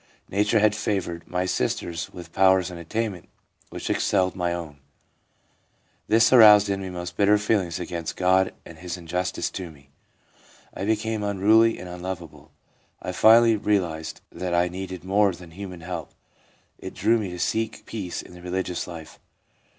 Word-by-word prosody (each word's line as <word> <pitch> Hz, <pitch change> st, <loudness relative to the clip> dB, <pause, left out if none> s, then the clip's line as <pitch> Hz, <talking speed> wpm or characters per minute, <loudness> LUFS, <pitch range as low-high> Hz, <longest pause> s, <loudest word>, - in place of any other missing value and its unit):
Nature 105 Hz, +3 st, +2 dB
had 105 Hz, 0 st, +4 dB
favoured 95 Hz, -5 st, -3 dB
my 90 Hz, +1 st, -1 dB
sisters 85 Hz, -2 st, -2 dB
with 85 Hz, -2 st, -11 dB
pow 95 Hz, 0 st, +5 dB
r 95 Hz, -, +6 dB
ers 90 Hz, -1 st, -3 dB
and 85 Hz, -, -8 dB
attainments 100 Hz, +2 st, -4 dB, 0.4 s
which -, -, -6 dB
excelled 95 Hz, -2 st, +1 dB
my 90 Hz, -2 st, -1 dB
own; 80 Hz, -4 st, -6 dB, 1.3 s
this 115 Hz, +2 st, +4 dB
aroused 105 Hz, -4 st, +8 dB
in 100 Hz, 0 st, -1 dB
me 95 Hz, -, -5 dB
most 90 Hz, -1 st, -6 dB
bitter 105 Hz, +2 st, +4 dB
feelings 100 Hz, -5 st, 0 dB
against 85 Hz, -2 st, -4 dB
God 95 Hz, +1 st, +3 dB
and 80 Hz, -1 st, -12 dB
His 90 Hz, +1 st, -5 dB
injustice 90 Hz, +2 st, -3 dB
to 90 Hz, -2 st, -6 dB
me. 70 Hz, -3 st, -19 dB, 0.8 s
I 95 Hz, -, -4 dB
became 110 Hz, 0 st, -1 dB
unruly 105 Hz, +3 st, +3 dB
and 90 Hz, -, -8 dB
unlovable. 90 Hz, -2 st, -7 dB, 0.5 s
I -, -, -5 dB
finally 115 Hz, +1 st, +6 dB
realised 85 Hz, -7 st, -1 dB
that 90 Hz, -1 st, -3 dB
I 90 Hz, +1 st, +2 dB
needed 95 Hz, -1 st, -7 dB
more 100 Hz, +1 st, +2 dB
than 85 Hz, -1 st, -13 dB
human 90 Hz, -1 st, -8 dB
help; 90 Hz, +2 st, -6 dB, 0.6 s
it -, -, -8 dB
drew 115 Hz, 0 st, +2 dB
me 100 Hz, -3 st, -3 dB
to 90 Hz, -, -7 dB
seek 110 Hz, +5 st, -2 dB
peace 95 Hz, -6 st, -5 dB
in -, -, -14 dB
the 90 Hz, -, -12 dB
religious 90 Hz, 0 st, -3 dB
life. 80 Hz, -2 st, -10 dB
95 Hz, 165 wpm, -24 LUFS, 85-105 Hz, 1.3 s, aroused